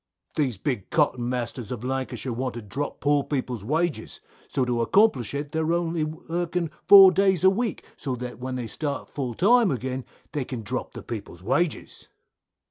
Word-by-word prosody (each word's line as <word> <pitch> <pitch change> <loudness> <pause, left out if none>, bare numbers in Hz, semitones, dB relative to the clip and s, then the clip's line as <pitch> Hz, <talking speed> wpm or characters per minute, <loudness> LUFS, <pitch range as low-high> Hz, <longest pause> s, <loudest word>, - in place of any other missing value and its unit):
Jack. 150 - +3
These 125 -6 -4
big 120 -3 -3
cotton 130 -6 +1
masters 125 -2 -3
of 120 -2 -5
Lancashire 130 -1 -3
want 125 0 -3
to 120 - -6
drop 135 +9 -4
poor 145 -1 +3
people's 125 -7 -3
wages, 160 +6 -1 0.3
so 130 - 0
to 120 -1 0
accomplish 140 - +3
it 145 +1 -4
they're 160 +1 0
only 170 -2 0
working 165 +2 -3 0.2
four 195 -2 +10
days 190 -2 +2
a 190 - +7
week, 220 -1 -2
so 130 -3 -2
that 125 -1 -7
when 130 +1 -4
they 125 -2 -3
start 140 +4 -4
full 125 -5 -3
time 230 +3 +5
again, 130 0 -3 0.3
they 150 -3 -1
can 125 -3 -6
drop 125 +5 -4
the - - -7
people's 100 -6 -7
wages. 170 - -1
135 Hz, 180 wpm, -25 LUFS, 125-165 Hz, 0.3 s, four